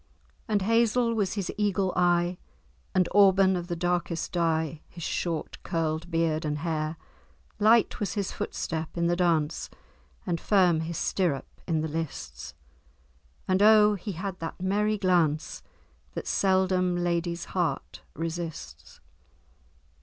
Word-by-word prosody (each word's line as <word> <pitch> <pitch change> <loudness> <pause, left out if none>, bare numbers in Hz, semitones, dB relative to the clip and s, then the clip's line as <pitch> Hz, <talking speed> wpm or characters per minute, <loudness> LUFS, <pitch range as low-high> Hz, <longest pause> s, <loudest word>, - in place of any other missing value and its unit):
And 210 -4 +1
hazel 230 +2 +2
was 205 -4 0
his 200 -4 -3
eagle 195 -2 +1
eye, 175 0 +2 0.6
And 185 -2 +3
auburn 195 -1 +5
of 175 -1 -4
the 175 - -2
darkest 175 -1 -1
dye, 160 -3 0
His 170 - -9
short 165 -1 -3
curl'd 165 -1 -2
beard 165 -2 0
and 150 -1 -1
hair. 155 0 -2 0.6
Light 220 +2 +4
was 205 - -2
his 200 -2 -2
footstep 160 0 -4
in 170 - +1
the 175 0 +2
dance, 165 -4 0 0.6
And 170 -4 -2
firm 180 -5 +3
his 160 +1 -4
stirrup 170 -8 -1
in 160 -3 +1
the 160 - -1
lists; 140 - -6 0.9
And 185 +1 +2
oh! 210 0 +7
he 200 +1 -5
had 185 +2 -5
that 165 - -6
merry 210 +3 +1
glance, 170 -5 +1 0.5
That - - -4
seldom 185 -2 +2
lady's 170 -1 -1
heart 175 -3 -2
resists." 165 0 -6
175 Hz, 130 wpm, -27 LUFS, 165-195 Hz, 0.9 s, oh